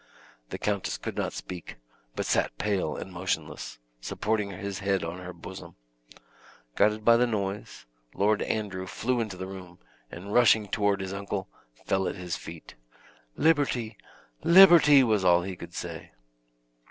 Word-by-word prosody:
The - - -5
countess 100 -2 -2
could - - -6
not - - -2
speak, 90 -2 -8 0.4
but - - -2
sat - - 0
pale 95 -7 -1
and 95 - -8
motionless, 85 -3 -4 0.2
supporting 105 - -2
his 100 +1 -5
head 100 -1 0
on 85 +2 -5
her 90 0 -7
bosom. 85 -2 -10 1.0
Guided 105 +1 +2
by 115 0 +7
the 125 +1 +3
noise, 100 -3 -4 0.3
Lord 105 +1 +2
Andrew 95 -4 -3
flew 125 +5 -1
into 105 -5 -3
the 95 - -5
room, 90 -2 -10 0.3
and 100 +4 -8
rushing 110 -3 +5
toward 100 -1 0
his 95 0 -5
uncle, 100 -3 -4 0.4
fell 95 -1 +1
at - - -3
his 90 -3 -4
feet. 80 -1 -10 0.6
"Liberty! 145 -8 +1 0.5
Liberty!" 170 -6 +8
was 110 -5 +1
all 90 -1 +4
he 95 0 -5
could - - -11
say. - - -7
100 Hz, 150 wpm, -27 LUFS, 90-110 Hz, 1.0 s, Liberty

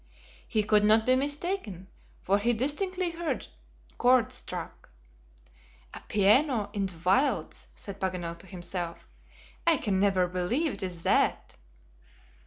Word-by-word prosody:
He 215 -3 +1
could 210 0 +3
not 220 +1 +4
be 255 - +4
mistaken, 285 - -2 0.4
for 200 +2 +2
he 235 +4 +2
distinctly 350 - -1
heard 335 0 -3 0.5
chords 250 -2 +4
struck. - - -5 1.0
"A - - -9
piano 215 +1 +3
in 200 -2 -1
the 180 -3 -6
wilds!" 255 +11 +1
said 200 -1 -8
Paganel 175 -3 -3
to 190 - -13
himself. 175 -2 -6 0.6
"I 330 -2 +6
can 200 -7 0
never 190 -2 +3
believe 185 - -1
it - - -8
is 180 -3 -5
that." - - +1
210 Hz, 130 wpm, -28 LUFS, 190-270 Hz, 1.0 s, I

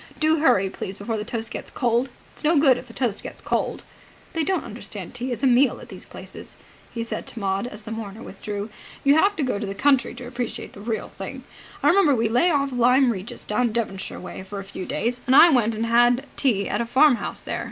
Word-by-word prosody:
Do 315 0 +3
hurry, 195 -11 +4
please, 190 0 -6
before 220 +2 -3
the 210 - -3
toast 225 0 -4
gets - - -5
cold. 245 +1 +1 0.2
It's - - -9
no 315 +1 +4
good 280 -3 +6
if - - -12
the - - -11
toast 235 -6 -1
gets - - -8
cold. - - -2 0.5
They 325 - +1
don't 380 +3 0
understand - - -7
tea 245 +1 -3
as 240 +1 -4
a - - +5
meal 255 0 +4
at - - -12
these - - -9
places," - - -10 0.3
he 230 - -3
said 230 - -5
to 235 - -7
Maud, 195 +2 -1
as 210 -2 -9
the 220 - -8
mourner 220 0 -6
withdrew. 205 0 -6 0.3
"You 280 - +6
have 395 +7 +4
to 315 - -1
go 250 -6 -1
to 210 - -3
the 195 - -4
country 265 +1 +2
to 245 0 -8
appreciate 245 -1 -5
the 200 - -11
real 220 0 -3
thing. - - -6 0.4
I - - +6
remember 345 -7 +5
we 225 -1 +1
lay 245 +10 +3
off 280 -4 +1
Lyme 250 +1 +4
Regis 195 0 -6
down 235 +2 0
Devonshire 210 -5 -3
way, 185 - -8
for 190 +2 -8
a - - -6
few 190 -1 -7
days, 245 +2 -1
and 260 - +5
I 340 - +9
went 230 -5 +2
and 225 +2 -1
had 240 +3 +4
tea 210 -8 +1
at 205 - -1
a - - -1
farmhouse 260 +1 +3
there. - - -3
240 Hz, 235 wpm, -24 LUFS, 215-270 Hz, 0.5 s, I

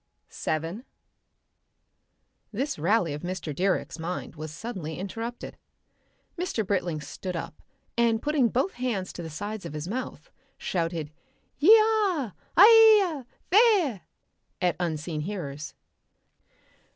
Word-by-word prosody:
Section - - -26 0.4
7 225 +8 -9 1.7
This 260 - -3
rally 175 -1 +2
of 145 - -6
Mr. 180 -4 -4
Direck's 185 0 -1
mind 170 +1 -5
was 155 0 -6
suddenly 165 -4 -6
interrupted. 225 +6 -6 0.8
Mr. 335 - -1
Britling 180 -5 -1
stood 180 +5 -6
up, 165 -1 -6 0.3
and 235 -1 +2
putting 290 -3 +2
both 265 - 0
hands 235 -7 -3
to - - -7
the 165 - -6
sides 205 +6 -5
of 170 - -7
his 150 +2 -5
mouth, 255 - -5 0.3
shouted 165 -4 -2 0.5
"Yi 380 +10 +8
ah! 410 - +1 0.2
Aye 430 -3 +8
ya! - - -11 0.3
Thea!" 380 - +4 0.6
at 180 -2 +1
unseen 160 -2 -2
hearers. 155 -5 -6
200 Hz, 120 wpm, -27 LUFS, 165-275 Hz, 1.7 s, Yi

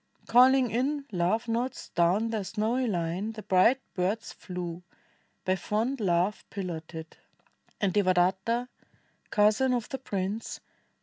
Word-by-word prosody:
Calling 255 0 +5
in 275 +4 0
love 190 +6 0
notes 235 +3 -2
down 185 +7 +2
their 220 -3 -1
snowy 225 +6 0
line 180 +2 -2
The 215 -1 -8
bright 195 +8 +4
birds 195 +5 -1
flew, 180 -2 -6 0.6
by 185 - +2
fond 225 +8 -1
love 185 0 +1
piloted; 165 -4 -6 0.6
And 195 -3 +1
Devadatta, 190 +5 +2 0.6
cousin 220 +5 +3
of 235 -3 -3
the 270 - -4
prince. 200 -2 -3
210 Hz, 120 wpm, -28 LUFS, 180-235 Hz, 0.6 s, Calling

